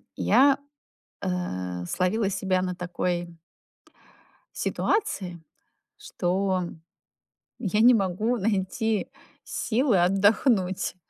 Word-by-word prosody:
я, 275 0 +4 0.6
а, 90 - -3
словила 195 - 0
себя 190 -1 0
на 180 -1 -2
такой 175 -1 -3 1.1
ситуации, 190 - -1 0.6
что 185 +1 -1 1.0
я 210 -1 0
не 245 +2 +7
могу 210 +4 0
найти 210 +1 -1 0.4
силы 240 -2 +1
отдохнуть. 195 0 +2
190 Hz, 75 wpm, -26 LUFS, 180-220 Hz, 1.1 s, не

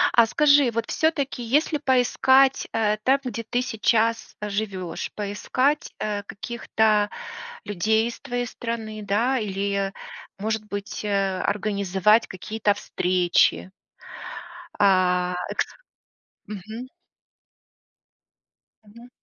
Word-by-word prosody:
А 235 -1 +7
скажи, 285 +1 +5
вот 230 0 -3
всё-таки, 290 -5 0
если 295 +5 +1
поискать,- 265 0 +3
э, 215 -1 +1
там, 270 +2 +4
где 230 -2 -4
ты 245 +2 -1
сейчас 225 -1 +1
живешь,- 200 -4 -3
поискать, 255 +8 0
э, 205 -1 -2
каких-то 215 -1 0 0.5
людей 220 +3 +1
из 235 - -7
твоей 245 0 -3
страны, 220 -2 -5
да, 230 +7 +1
или, 200 -2 -1 0.5
может 215 +1 -2
быть, 205 0 -5
э, 195 -2 0
организовать 200 +1 +2
какие-то 205 +2 -1
встречи. 180 -1 +1 1.1
А, 180 -2 +3 0.2
эксп - - -1 0.8
Мгм. 215 +5 -7 2.0
Мгм. 235 +4 -15
215 Hz, 95 wpm, -24 LUFS, 200-240 Hz, 2.0 s, А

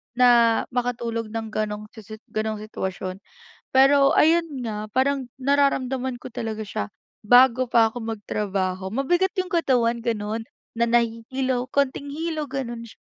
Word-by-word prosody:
na 240 -2 +5
makatulog 235 -2 -2
nang 225 -1 -4
gano'ng 210 -1 -3
sisit 215 0 -11
gano'ng 215 -1 -2
sitwasyon. 190 -3 -5 0.5
Pero 275 +1 +5
ayun 330 +2 +4 0.2
nga, 215 -1 -4
parang 265 +1 0
nararamdaman 265 -2 +1
ko 250 - -10
talaga 220 -1 -4
siya 150 - -3 0.4
bago 250 +2 +5
pa 225 -2 +4
ako 245 - -6
magtrabaho. 190 -3 -2
Mabigat 350 - +1
yung 370 -1 -2
katawan 245 -8 +2
ganun, 220 -1 -2 0.3
na 235 +1 +1
nahihilo, 245 +2 0
kaunting 280 +1 0
hilo, 310 0 -3
gano'n 240 -4 -4
sy - - -15
240 Hz, 135 wpm, -24 LUFS, 220-265 Hz, 0.5 s, na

